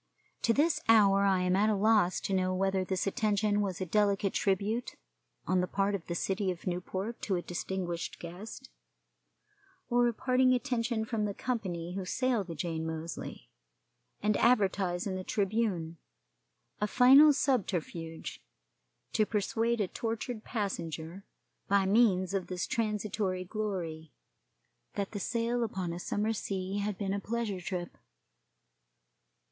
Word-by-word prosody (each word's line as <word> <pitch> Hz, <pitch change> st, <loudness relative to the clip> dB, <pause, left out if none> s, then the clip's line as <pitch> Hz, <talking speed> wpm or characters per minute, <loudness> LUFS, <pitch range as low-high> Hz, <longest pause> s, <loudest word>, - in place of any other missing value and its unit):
To -, -, +3 dB
this 295 Hz, +7 st, +2 dB
hour 200 Hz, -3 st, +6 dB
I 190 Hz, -2 st, +3 dB
am 180 Hz, 0 st, +2 dB
at 210 Hz, +3 st, +3 dB
a 215 Hz, -, +2 dB
loss 205 Hz, -3 st, +3 dB
to 195 Hz, -, -2 dB
know 185 Hz, 0 st, +1 dB
whether 190 Hz, 0 st, +1 dB
this 185 Hz, 0 st, -1 dB
attention 210 Hz, 0 st, +1 dB
was 190 Hz, -4 st, -2 dB
a 185 Hz, -, -2 dB
delicate 200 Hz, +1 st, +2 dB
tribute 205 Hz, +5 st, 0 dB, 0.5 s
on 185 Hz, 0 st, +2 dB
the 180 Hz, -, -1 dB
part 200 Hz, +2 st, 0 dB
of 195 Hz, -4 st, -4 dB
the 170 Hz, -, -3 dB
city 195 Hz, +2 st, -1 dB
of 180 Hz, -2 st, -5 dB
Newport 190 Hz, +5 st, -3 dB
to 195 Hz, -, 0 dB
a 175 Hz, -, -1 dB
distinguished 175 Hz, -1 st, -4 dB
guest, 200 Hz, +9 st, -9 dB, 1.2 s
or 240 Hz, 0 st, +4 dB
a 235 Hz, -, 0 dB
parting 255 Hz, +1 st, +3 dB
attention 240 Hz, -3 st, -1 dB
from 220 Hz, -2 st, -1 dB
the 200 Hz, -1 st, -3 dB
company 180 Hz, -8 st, -3 dB
who 195 Hz, 0 st, -3 dB
sail 245 Hz, +3 st, 0 dB
the 170 Hz, -3 st, -7 dB
Jane 160 Hz, +1 st, -3 dB
Moseley, 160 Hz, -, -6 dB, 0.7 s
and 210 Hz, 0 st, +3 dB
advertise 195 Hz, -6 st, +2 dB
in 195 Hz, -, -2 dB
the 185 Hz, 0 st, -4 dB
Tribune 195 Hz, -5 st, -1 dB, 0.8 s
a 210 Hz, -, +1 dB
final 265 Hz, +7 st, +8 dB
subterfuge 180 Hz, -, -2 dB, 0.7 s
to 215 Hz, -, +3 dB
persuade 225 Hz, +2 st, 0 dB
a 205 Hz, -, +1 dB
tortured 225 Hz, +2 st, -4 dB
passenger, 170 Hz, -, -4 dB, 0.4 s
by 200 Hz, -1 st, +3 dB
means 195 Hz, -3 st, +3 dB
of 195 Hz, -2 st, -1 dB
this 180 Hz, -1 st, -2 dB
transitory 210 Hz, -4 st, -1 dB
glory, 180 Hz, -6 st, -4 dB, 0.8 s
that 200 Hz, -1 st, -2 dB
the 205 Hz, -, -4 dB
sail 235 Hz, +4 st, 0 dB
upon 190 Hz, -6 st, -3 dB
a 170 Hz, -, -5 dB
summer 210 Hz, +5 st, -1 dB
sea 195 Hz, -1 st, -3 dB
had 205 Hz, -1 st, -2 dB
been 195 Hz, -2 st, -2 dB
a 200 Hz, -, -1 dB
pleasure 215 Hz, -3 st, -3 dB
trip. 175 Hz, -1 st, -4 dB
200 Hz, 145 wpm, -31 LUFS, 185-220 Hz, 1.2 s, final